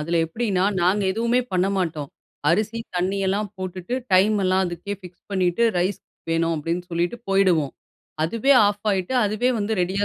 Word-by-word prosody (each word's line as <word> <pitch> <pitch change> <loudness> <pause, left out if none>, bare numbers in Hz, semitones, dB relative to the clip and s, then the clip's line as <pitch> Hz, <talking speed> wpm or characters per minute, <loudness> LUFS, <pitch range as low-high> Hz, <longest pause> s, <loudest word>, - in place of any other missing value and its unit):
அதில 165 +3 -1
எப்படின்னா, 190 +1 0 0.2
நாங்க 185 +4 +2
எதுவுமே 235 +4 +1
பண்ண 185 0 +2
மாட்டோம். 160 -6 -2 0.4
அரிசி 215 +6 0 0.2
தண்ணியெல்லாம் 195 +3 0
போட்டுட்டு, 185 +3 -5 0.2
டைம் 200 +4 +5
எல்லாம் 185 +1 +3
அதுக்கே 175 +4 -5
ஃபிக்ஸ் 180 -2 -14
பண்ணிட்டு, 185 +2 +1 0.2
ரைஸ் 185 +3 0 0.3
வேணும் 165 0 +1
அப்டின்னு 165 +4 -2
சொல்லிட்டு, 170 +6 -1
போயிடுவோம். 185 -7 +3 0.5
அதுவே 230 +11 +2
ஆஃப் 205 +1 -2
ஆயிட்டு, 190 +4 -1
அதுவே 215 +4 +1
வந்து 210 +1 -1
ரெடியா 190 +3 0
185 Hz, 150 wpm, -23 LUFS, 175-205 Hz, 0.5 s, டைம்